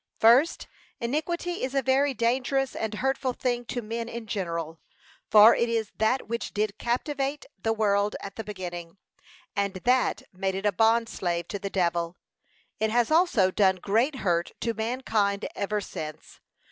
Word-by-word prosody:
First, 250 +9 +5 0.3
Iniquity 340 +8 -2
is 260 +1 -2
a 270 - +2
very 270 +1 +2
dangerous 255 +4 0
and 220 -1 -2
hurtful 265 +2 0
thing 245 -1 -2
to 245 0 -4
men 230 +2 -4
in 235 -1 -6
general; 170 -6 -3 0.5
for 215 +2 +9
it 235 - +1
is 225 -2 -1
that 220 +5 +1
which 235 -2 -4
did 210 0 -1
captivate 275 +4 -2 0.2
the 225 - +1
world 205 -2 +1
at 195 - -8
the 225 - -5
beginning, 175 -4 -7 0.6
and 200 -1 -1
that 250 +7 +1
made 190 +1 -2
it 195 +2 -4
a 205 - +4
bond 225 +4 +3
slave 175 -5 -2
to 200 - -4
the 200 0 -4
devil. 170 -2 0 0.6
It 220 - +1
has 235 +2 +2
also 310 - +4
done 190 -1 +3
great 225 +10 +1
hurt 170 -1 +1
to 230 - 0
mankind 220 -3 -1
ever 210 +1 -1
since. 155 -5 -8
220 Hz, 160 wpm, -27 LUFS, 195-250 Hz, 0.6 s, for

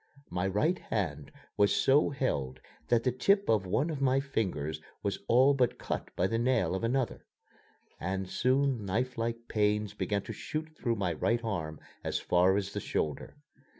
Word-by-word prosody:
My 90 +2 0
right 155 - +1
hand 75 -9 -3 0.3
was 100 0 +4
so 140 +3 +4
held 70 - -2 0.3
that 120 -1 +3
the 125 - +2
tip 200 - +2
of 105 -4 +2
one 140 - +1
of 145 -3 -4
my 135 0 +3
fingers 90 - -2 0.2
was 100 -1 -1
all 130 +4 +6
but 125 -3 +1
cut - - -4
by 90 - +1
the 115 +4 0
nail 120 -8 +2
of 95 - -2
another, 125 +1 -1 0.7
and 95 +1 -2
soon 130 +2 +1
knifelike 115 +2 -2
pains 105 -1 +1
began 105 -1 -1
to - - -6
shoot 155 0 -5
through 120 -5 -1
my 95 -5 -1
right 115 +9 0
arm 85 -8 -3 0.2
as - - -1
far 90 +2 +3
as 100 -1 -3
the - - -2
shoulder. 75 -2 -3
110 Hz, 170 wpm, -30 LUFS, 95-130 Hz, 0.7 s, all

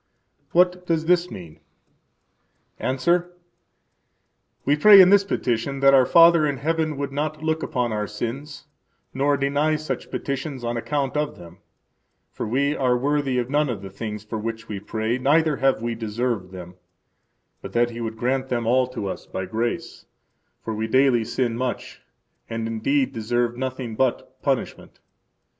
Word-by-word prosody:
What 180 +1 +2
does 160 -1 0
this 180 +1 +2
mean? 80 -4 -10 1.2
–Answer: 170 +7 0 1.3
We 145 - +3
pray 200 +6 +8
in 185 0 +8
this 200 -1 +6
petition 135 - -2
that 135 0 +6
our 130 -2 +5
Father 170 -1 +6
in 140 -2 -2
heaven 155 +1 -1
would 140 0 -3
not 150 +2 -3
look 160 0 0
upon 125 -3 -1
our 105 -1 -2
sins, 135 +8 -6 0.5
nor 140 +2 +1
deny 145 +3 +1
such 155 0 -5
petitions 140 -1 -4
on 120 0 -2
account 140 +3 -2
of 150 0 -2
them; 85 +1 -13 0.7
for - - -5
we 140 +6 +1
are 125 -3 +2
worthy 140 0 0
of 125 +1 -2
none 150 -1 +2
of 105 -5 -4
the 95 - -8
things 105 +1 -6
for 110 +1 -5
which 115 +1 -5
we 105 -2 -5
pray, 110 +4 -2
neither 150 +2 +2
have 135 -4 +1
we 120 0 -1
deserved 115 -3 -3
them; 90 -1 -10 0.8
but 95 - -9
that 120 0 +2
He 120 0 -7
would 110 -1 -4
grant 130 +3 -1
them 120 -2 -1
all 125 +2 +3
to 125 -5 -6
us 95 - -6
by 95 - -4
grace; 115 +5 -4 0.6
for 110 - -4
we 110 +1 -2
daily 130 -1 +3
sin 120 +1 -1
much, 125 +1 -4 0.5
and 115 0 -3
indeed 130 +5 0
deserve 120 +1 -1
nothing 130 -2 -4
but 130 +1 -1
punishment. - - -3
130 Hz, 160 wpm, -23 LUFS, 115-145 Hz, 1.3 s, pray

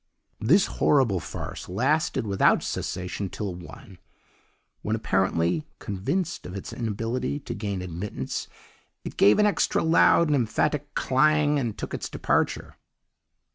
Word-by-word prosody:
"This 160 - +4
horrible 125 -10 +2
farce - - -7
lasted 150 - +1
without 100 -2 +3
cessation 90 +2 -3
till 100 -2 -4
one, 90 +1 -12 0.8
when, 105 - -1
apparently 95 - +1
convinced 165 - -3
of 90 - -8
its 100 - -6
inability 115 +5 -2
to - - -5
gain 100 -3 -4
admittance, 90 +3 -5 0.6
it - - -7
gave 100 - +5
an 210 - +4
extra 205 - +1
loud 165 +1 +5
and 150 -2 +2
emphatic 145 +4 0
clang 150 +2 +3
and 120 -5 -3
took - - -6
its - - -4
departure. - - -1
110 Hz, 130 wpm, -26 LUFS, 95-150 Hz, 0.8 s, gave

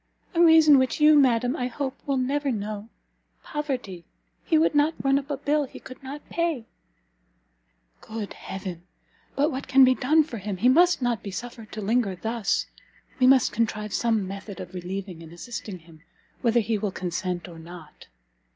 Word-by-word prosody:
"A 340 - +2
reason 320 -4 +7
which 260 +3 0
you, 305 0 +7
madam, 250 -2 +3
I 250 - -2
hope, 265 +2 -4
will 275 -1 +1
never 275 +2 0
know, 210 -1 -5 0.5
Poverty! 255 - -4 0.4
he 325 - +2
would 315 0 +3
not 295 +2 +3
run 275 0 +3
up 280 0 -11
a 285 - -2
bill 295 +1 +1
he 265 - -12
could 255 - -12
not 275 +2 -9
pay." 335 -9 -1 1.4
"Good 215 -2 -6
Heaven! 180 -2 -7 0.5
But 290 +4 +2
what 265 0 -5
can 265 +1 +6
be 255 - +5
done 305 +5 +3
for 240 -7 -7
him? 200 -1 -4
He 240 +7 +3
must 345 +1 +4
not 240 -4 0
be 200 - -6
suffered 225 +2 -8
to 215 - -5
linger 210 -1 +1
thus; 220 +2 -1 0.5
we 255 - +5
must 260 -2 +5
contrive 215 -2 -2
some 225 -5 +1
method 200 +1 -8
of 180 0 -8
relieving 185 -1 -6
and 165 -1 -12
assisting 200 +2 -7
him, 165 -2 -18 0.4
whether 235 0 +3
he 220 0 -1
will 205 -1 -2
consent 180 0 -3
or 170 -2 -11
not." 165 -1 -12
235 Hz, 180 wpm, -25 LUFS, 195-275 Hz, 1.4 s, reason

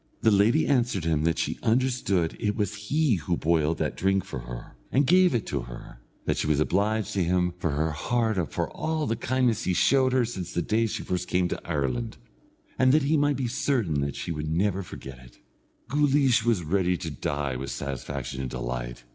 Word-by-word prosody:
The 110 - +4
lady 105 +9 +4
answered 120 -10 +1
him 80 -2 +1
that 80 -1 +1
she - - -2
understood 110 -8 +1
it 105 -2 0
was 105 -3 -1
he 150 -6 +2
who 85 +1 -2
boiled 80 0 +1
that - - -2
drink 95 0 +1
for 65 - -6
her, - - -9 0.2
and 140 +3 +3
gave 180 0 +5
it 115 - -1
to 70 - -2
her; - - -10 0.3
that - - 0
she - - -1
was 75 -2 +2
obliged 100 +6 +1
to 95 - +1
him 90 0 +1
from 80 -4 -1
her 80 +2 0
heart 110 +1 0
for - - -1
all 155 -1 -2
the 115 - 0
kindness 125 -1 0
he 90 - +1
showed 130 +4 +4
her 125 -1 +3
since 95 -7 -6
the 85 - 0
day 115 +4 +1
she - - -4
first 90 0 -2
came 90 0 +1
to - - -4
Ireland, 65 -6 -2 0.6
and 130 0 +5
that 155 -1 +4
he 150 +3 +2
might 145 -2 +2
be 130 -2 -1
certain 115 - 0
that 70 0 -2
she 70 +4 -4
never 85 +6 0
would 95 - -6
forget 65 -2 -9
it. 60 -1 -16 0.5
Guleesh 140 -4 +3
was 115 -6 +1
ready 90 +2 +1
to 80 - -5
die 70 -1 -2
with 65 +2 -5
satisfaction 70 0 -4
and 65 - -3
delight. - - -5
90 Hz, 205 wpm, -26 LUFS, 75-120 Hz, 0.6 s, gave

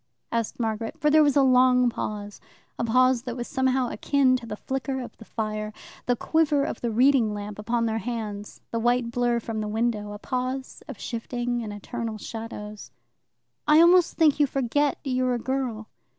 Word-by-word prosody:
asked 230 0 -2
Margaret, 225 -1 -2
for 300 - +3
there 310 +1 +6
was 290 -3 +3
a 275 - +6
long 250 -1 +5
pause 205 -3 -4 0.4
a - - 0
pause 255 +1 +3
that 245 0 -6
was 240 - -4
somehow 260 -1 +1
akin 265 +3 +2
to 240 -2 -10
the 210 - -4
flicker 265 +3 -3
of 250 - -8
the 225 - -13
fire, 215 -1 -3 0.4
the 245 - +3
quiver 300 +1 +2
of 255 - -4
the 235 - -1
reading 240 -2 +3
lamp 205 0 -6
upon 230 +2 0
their 225 0 -1
hands, 215 -4 -5
the 230 - -1
white 240 0 +1
blur 240 0 +1
from 225 -1 -4
the 210 - -3
window; 215 -1 -1
a - - -6
pause 255 +4 -4
of 275 -7 -8
shifting 240 +1 -3
and 215 -2 -5
eternal 220 +2 -5
shadows. 215 -1 -7 0.8
"I 300 +1 +7
almost 350 +1 +5
think 305 -3 +4
you 290 - +4
forget 275 +2 0
you're 255 -2 0
a - - 0
girl." 245 -3 -3
240 Hz, 185 wpm, -25 LUFS, 220-260 Hz, 0.8 s, I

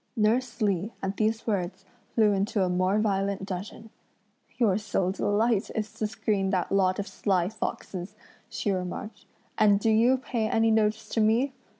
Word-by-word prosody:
Nurse 225 +2 +1
Li 200 +1 0
at 195 +1 -2
these 220 +1 0
words 190 -3 -2 0.3
flew 215 -2 +4
into 200 +1 +1
a 185 - +1
more 185 +3 +1
violent 195 -2 0
dudgeon. 200 +3 -7 0.7
"Your 210 -5 +3
sole 195 -3 -1
delight 205 +2 +1
is 215 -1 -3
to 215 - -2
screen 205 -2 -1
that 185 -2 -1
lot 185 -1 +2
of 200 - -3
sly 185 -3 0
foxes!" 195 -2 -5 0.3
she 205 - -2
remarked, 195 +3 -5 0.3
"and 205 -2 +5
do 220 +2 +2
you 235 +4 +4
pay 240 -4 -2
any 225 0 +3
notice 215 -1 +1
to 225 - 0
me? 235 +6 +2
210 Hz, 165 wpm, -27 LUFS, 195-220 Hz, 0.7 s, and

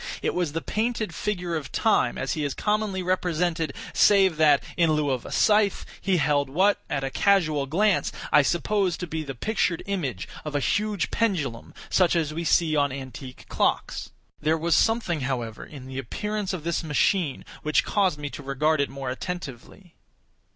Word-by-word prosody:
It - - 0
was 175 -5 -1
the 165 - -3
painted 220 -4 -1
figure 180 -3 -2
of 150 -4 -5
Time - - +2
as - - -2
he 155 - -2
is 140 -2 -2
commonly 210 -3 -1
represented, 175 -3 0 0.2
save 190 -5 +5
that, 150 -3 +5
in 165 -2 +3
lieu 150 -2 +1
of 125 -2 -3
a - - -8
scythe, 210 -2 +3 0.2
he 190 -2 +2
held 145 -3 +1
what, 190 +8 +2
at 135 - -1
a 135 - -2
casual 155 -8 +2
glance, 200 +7 +2 0.2
I - - +7
supposed 180 +4 0
to - - -2
be 160 -1 -4
the 135 -3 -6
pictured 185 - -1
image 145 - -3 0.2
of 150 -1 -5
a - - +3
huge 205 +6 0
pendulum 165 - -1 0.2
such 180 -2 +3
as 155 -3 0
we 165 +2 -3
see 165 -1 +2
on 145 -2 +2
antique 130 -1 -8
clocks. - - -1 0.3
There 155 +2 +1
was 165 +1 0
something, 200 -6 +2
however, 120 -4 -3
in 140 -4 -11
the 130 0 -6
appearance 210 - -3
of 180 -5 -5
this 170 +1 -1
machine 155 0 +1 0.2
which 155 0 +1
caused 190 -6 +1
me 145 -1 -5
to - - -7
regard 140 +2 +1
it 140 - 0
more 135 -1 -5
attentively. 170 - -7
160 Hz, 180 wpm, -25 LUFS, 140-190 Hz, 0.3 s, I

